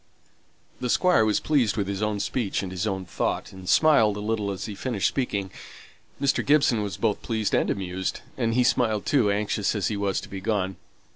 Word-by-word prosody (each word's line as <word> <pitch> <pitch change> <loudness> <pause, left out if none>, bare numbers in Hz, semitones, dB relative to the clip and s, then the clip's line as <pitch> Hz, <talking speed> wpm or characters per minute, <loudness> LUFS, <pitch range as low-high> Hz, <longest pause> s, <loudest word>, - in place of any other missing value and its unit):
The 125 - -2
Squire 180 -4 +4
was 110 -1 +2
pleased 130 -8 +1
with 100 -2 0
his 100 0 -3
own 105 -1 0
speech 100 -2 -1
and 95 - -5
his 95 +3 -2
own 95 -2 -2
thought, 85 - -2
and 95 -1 -8
smiled 115 -10 +4
a - - -4
little 105 -1 -1
as 95 -2 -4
he 105 - -5
finished 110 -1 -1
speaking. 100 -8 -2 0.7
Mr. 140 -1 +1
Gibson 140 -6 +3
was 100 -5 -4
both 110 -3 0
pleased 110 -3 -2
and - - +2
amused; 95 -1 -3
and 115 -4 0
he 125 - +4
smiled 110 -4 +1
too, 125 -8 +3
anxious 105 +1 0
as 105 - 0
he 105 - -2
was 100 -1 0
to - - -10
be 95 -1 -7
gone. 95 -2 -1
105 Hz, 205 wpm, -25 LUFS, 100-115 Hz, 0.7 s, Squire